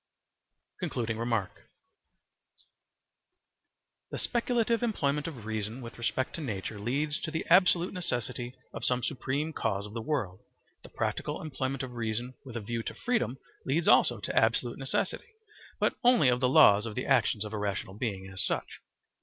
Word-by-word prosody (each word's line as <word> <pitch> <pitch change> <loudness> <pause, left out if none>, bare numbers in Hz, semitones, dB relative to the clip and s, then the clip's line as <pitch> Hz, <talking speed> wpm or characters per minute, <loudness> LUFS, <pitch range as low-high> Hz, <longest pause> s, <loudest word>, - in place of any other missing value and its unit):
Concluding 115 -2 -2
Remark 115 -4 -2 2.4
The - - -4
speculative 235 -1 +1
employment 150 -11 0
of 130 -10 -7
reason 110 +2 -3
with 120 -1 -9
respect 130 +3 -1
to 165 - -5
nature 105 -5 -4
leads 145 +8 -1
to - - -4
the 160 0 -3
absolute 180 0 +5
necessity 125 - -3 0.2
of - - -6
some 125 -1 +1
supreme 145 +4 -1
cause 100 -6 -1
of 105 - -9
the 115 - -3
world: 110 -10 -2 0.4
the - - -13
practical - - -2
employment 135 -3 -3
of 125 -2 -6
reason 120 +2 -3
with 125 -3 -7
a - - -3
view 115 +2 -3
to - - -5
freedom 175 - 0 0.3
leads 155 +5 +1
also 120 -3 +5
to - - -4
absolute 115 +3 +2
necessity, 135 - -2 0.5
but - - +2
only 240 - +6
of 125 0 +2
the 125 -1 +3
laws 105 -3 +7
of 110 - -6
the - - -2
actions 105 - +2
of 105 - -7
a 110 - -2
rational 100 -2 -2
being 100 -4 -3
as 95 0 -4
such. - - -3
125 Hz, 160 wpm, -30 LUFS, 110-150 Hz, 2.4 s, laws